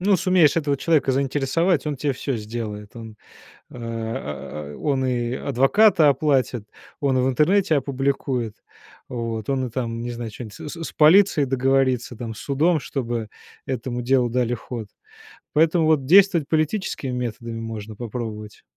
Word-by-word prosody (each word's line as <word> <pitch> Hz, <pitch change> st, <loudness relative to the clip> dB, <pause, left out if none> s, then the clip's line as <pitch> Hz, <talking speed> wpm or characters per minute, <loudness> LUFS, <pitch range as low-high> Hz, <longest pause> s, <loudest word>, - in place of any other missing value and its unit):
ну, 195 Hz, +1 st, +3 dB
сумеешь 180 Hz, -5 st, +3 dB
этого 145 Hz, -3 st, +1 dB
человека 150 Hz, -3 st, +2 dB
заинтересовать, 140 Hz, +5 st, +1 dB
он 150 Hz, -2 st, -2 dB
те 140 Hz, +1 st, -1 dB
всё 130 Hz, 0 st, -3 dB
сделает. 105 Hz, -1 st, -6 dB
Он, 110 Hz, -2 st, -9 dB, 0.5 s
а, 110 Hz, -, -6 dB
он 135 Hz, -3 st, 0 dB
и 120 Hz, -1 st, -1 dB
адвоката 150 Hz, -, +4 dB
оплатит, 130 Hz, -6 st, +1 dB, 0.3 s
он 135 Hz, -3 st, +1 dB
в 130 Hz, +1 st, +2 dB
интернете 160 Hz, +5 st, +3 dB
опубликует, 135 Hz, -4 st, -1 dB, 0.5 s
вот, 115 Hz, -2 st, -4 dB
он 130 Hz, -2 st, 0 dB
и -, -, -7 dB
там, 115 Hz, -1 st, -3 dB
не 120 Hz, -, -4 dB
знаю, 120 Hz, -1 st, -5 dB
чё-нибудь 110 Hz, -1 st, -9 dB
с -, -, -8 dB
с 165 Hz, -1 st, -6 dB
с -, -, -6 dB
полицией 160 Hz, -2 st, +5 dB
договорится, 130 Hz, -2 st, +1 dB
там, 115 Hz, -1 st, -6 dB
с -, -, -12 dB
судом, 155 Hz, +5 st, +1 dB
чтобы 120 Hz, -5 st, -3 dB, 0.4 s
этому 125 Hz, -1 st, -3 dB
делу 125 Hz, 0 st, +2 dB
дали 120 Hz, 0 st, 0 dB
ход. 115 Hz, -2 st, -7 dB, 0.7 s
Поэтому 160 Hz, +1 st, +3 dB
вот 155 Hz, -4 st, +2 dB
действовать 175 Hz, -1 st, +5 dB
политическими 155 Hz, -3 st, -1 dB
методами 115 Hz, -2 st, -4 dB
можно 110 Hz, -1 st, -6 dB
попробовать. 110 Hz, -2 st, -6 dB
130 Hz, 145 wpm, -23 LUFS, 115-150 Hz, 0.7 s, полицией